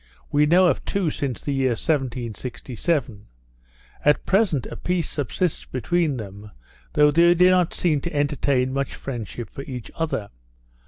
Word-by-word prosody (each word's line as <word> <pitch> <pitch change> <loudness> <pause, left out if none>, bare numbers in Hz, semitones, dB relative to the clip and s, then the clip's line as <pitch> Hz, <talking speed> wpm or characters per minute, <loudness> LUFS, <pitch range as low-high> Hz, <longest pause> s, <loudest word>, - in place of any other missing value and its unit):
We 150 +1 +4
know 180 +4 +5
of 175 - +2
two 190 -6 0
since 135 -5 -3
the 140 - -2
year 130 -2 +2
1767; 125 - -2 0.8
at 150 0 +3
present 190 - +2
a - - -7
peace 180 -3 -1
subsists 150 +4 -2
between 155 +2 0
them, 105 -1 -8 0.4
though 150 0 +5
they 170 +3 +5
do 180 +1 +6
not 180 -2 +2
seem 155 -5 +1
to 170 - -5
entertain 140 -3 +1
much 140 0 -2
friendship 120 -2 -6
for - - -7
each 130 -4 -7
other. 155 -11 -3
145 Hz, 150 wpm, -23 LUFS, 125-170 Hz, 0.8 s, do